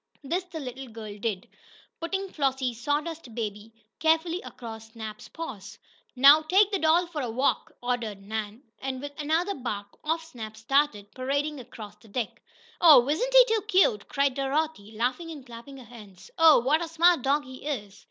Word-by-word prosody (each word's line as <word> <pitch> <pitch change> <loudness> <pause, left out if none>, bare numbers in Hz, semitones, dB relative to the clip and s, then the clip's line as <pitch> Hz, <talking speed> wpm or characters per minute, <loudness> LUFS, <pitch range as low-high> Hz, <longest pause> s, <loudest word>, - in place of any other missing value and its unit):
This 350 +7 -2
the 345 -3 -7
little 265 -1 -7
girl 220 -3 -8
did, 200 -4 -3 0.5
putting 385 +4 -3
Flossie's 265 -4 -1
"sawdust 295 -2 -3
baby" 210 -1 -5 0.3
carefully 325 +3 +2
across 225 -2 -10
Snap's 220 -2 -8
paws. 215 - -8 0.4
"Now 280 +4 +8
take 380 +6 +3
the 395 - 0
doll 325 +2 +4
for 330 -4 -5
a 245 - -3
walk!" 255 +5 0
ordered 235 -5 -2
Nan, 215 +3 -5 0.2
and, 265 -1 -4
with 285 +2 -6
another 330 +6 +1
bark, 205 - -5
off 325 +2 -1
Snap 220 -8 -9
started, 225 -4 +1
parading 285 +3 -2
across 210 -4 -10
the 225 - -20
deck. 220 +1 -4 0.4
"Oh, 295 -7 +8
isn't 330 - 0
he - - +8
too 440 - 0
cute!" 365 - +3
cried 280 -1 +1
Dorothy, 275 -4 -2
laughing 250 +9 -2
and 295 -5 -9
clapping 245 +3 -11
her 255 - -12
hands. 215 - -14
"Oh, 325 -3 +7
what 290 +7 +2
a - - -4
smart 335 -1 +4
dog 285 +3 +1
he 260 +3 -10
is!" 210 -8 -4
270 Hz, 170 wpm, -27 LUFS, 225-320 Hz, 0.5 s, Now